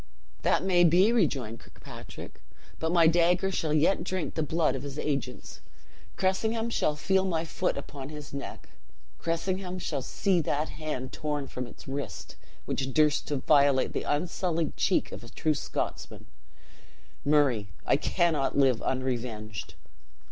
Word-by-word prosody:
"That - - +2
may 180 -2 +4
be," 180 +6 +5
rejoined 135 - 0
Kirkpatrick; - - -11 0.4
"but 160 0 0
my 170 -2 +5
dagger 175 +3 +4
shall 160 -4 -1
yet 155 +4 +3
drink 185 -1 -3
the 160 - -1
blood 160 -2 +1
of 135 - -4
his 140 0 -6
agents. 135 -4 -3 0.5
Cressingham 220 +5 0
shall 150 -8 +1
feel 190 +5 +2
my 170 -3 -1
foot 180 +1 -1
upon 140 -1 -7
his 150 -2 -9
neck! 140 - -7 0.5
Cressingham 185 +2 -2
shall 150 -6 -2
see 185 +6 +1
that 150 0 -1
hand 150 -5 -5
torn 150 -2 -2
from 125 -1 -5
its - - -14
wrist, 140 +1 -5 0.3
which 135 0 -2
durst 150 -1 +3
to 145 - -1
violate 140 -1 +4
the - - -1
unsullied 170 +1 -1
cheek - - +1
of - - -8
a 120 - -10
true 155 +6 0
Scotsman. 145 - -4 1.0
Murray, 140 -9 +3 0.2
I - - +4
cannot 155 -2 +1
live 130 -4 +4
unrevenged." 120 -6 -3
150 Hz, 145 wpm, -28 LUFS, 135-175 Hz, 1.0 s, be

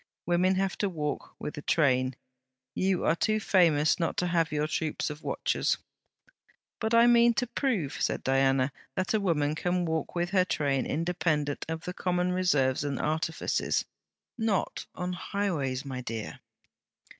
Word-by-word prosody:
Women 180 +2 +2
have 195 0 -1
to 205 - +1
walk 150 -4 -4
with 150 - -6
a - - -7
train. 130 -5 +2 0.6
You 190 -1 +1
are 160 - +3
too 215 +4 +1
famous 165 -7 +3
not 165 - -1
to 180 - +1
have 170 -2 +1
your 150 0 0
troops 155 0 -2
of 150 +1 -9
watchers.' - - 0 1.0
'But 220 +1 +1
I 230 0 +7
mean 235 -1 +5
to 245 - +1
prove,' 225 - -1
said - - 0
Diana, 135 0 +2 0.2
'that 185 - -1
a 220 - +3
woman 155 -7 +1
can 175 +2 0
walk 160 -1 -2
with 175 +1 -1
her 190 -2 +4
train 140 -7 0
independent 160 -3 -1
of 160 0 -4
the 180 - -4
common 180 -1 0
reserves 145 -9 +2
and 140 -2 -2
artifices.' 160 +1 0 0.5
'Not 220 -4 -1
on 180 0 -3
highways, 160 -9 -2
my 130 -2 -5
dear!' 115 -3 -5
165 Hz, 155 wpm, -29 LUFS, 145-185 Hz, 1.0 s, I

